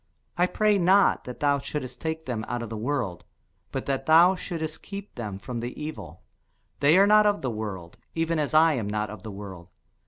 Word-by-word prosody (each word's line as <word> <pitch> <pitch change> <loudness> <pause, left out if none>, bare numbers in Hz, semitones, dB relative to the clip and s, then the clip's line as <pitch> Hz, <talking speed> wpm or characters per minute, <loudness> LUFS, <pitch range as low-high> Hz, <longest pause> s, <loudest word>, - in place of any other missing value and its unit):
I 180 +1 +3
pray 210 +1 +2
not 190 +3 +4
that 125 - -8
thou 145 -1 +3
shouldest 135 -2 -6
take 160 0 -3
them 115 -4 -3
out 120 0 -3
of 115 - -7
the - - -3
world, 110 -7 -2 0.5
but - - -4
that 135 -1 -2
thou 170 +4 +7
shouldest 160 -4 -5
keep 200 0 -8
them 105 -5 -5
from 120 +4 -6
the 120 +2 -6
evil. 155 +1 -7 0.6
They 145 +5 +5
are 195 - +7
not 210 +1 +6
of 205 -5 0
the 130 - -1
world, 100 -6 -6 0.2
even 165 0 0
as 150 +1 -1
I 160 0 +6
am 115 -7 -2
not 105 0 -2
of 105 -3 -9
the 110 - -8
world. 95 -4 -9
140 Hz, 210 wpm, -26 LUFS, 110-165 Hz, 0.6 s, thou